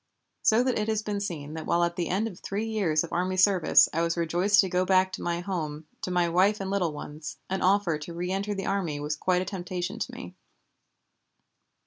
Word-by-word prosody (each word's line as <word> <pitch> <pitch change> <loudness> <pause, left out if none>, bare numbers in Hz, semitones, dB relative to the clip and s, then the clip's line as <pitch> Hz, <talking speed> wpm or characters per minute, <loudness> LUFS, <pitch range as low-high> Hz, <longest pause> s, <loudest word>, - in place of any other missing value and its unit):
So 225 +3 +4
that 255 -3 0
it 210 - -1
has 220 -1 0
been 205 -1 -2
seen 155 -7 -5
that 160 -1 -6
while 175 - +2
at 170 0 0
the 175 -2 -2
end 200 +5 0
of 185 -5 -9
three 205 +3 -3
years 195 -9 +1
of 170 - -7
army 185 +2 0
service 185 -2 +5
I 165 - +1
was 170 0 0
rejoiced 175 +5 +2
to 195 - -1
go 180 0 +1
back 185 0 +3
to - - -6
my 170 0 -1
home, 160 -5 -4 0.2
to - - -3
my 175 -1 +2
wife 190 +5 +3
and 195 -1 -3
little 185 -5 +1
ones, 150 +1 -8
an 190 - -1
offer 185 -4 +2
to 155 +3 -8
reënter 195 +4 -2
the 195 - -3
army 175 -7 -1
was 150 +1 -2
quite 180 +3 +1
a - - -8
temptation 180 -1 -4
to - - -3
me. - - -9
180 Hz, 220 wpm, -27 LUFS, 170-200 Hz, 0.2 s, service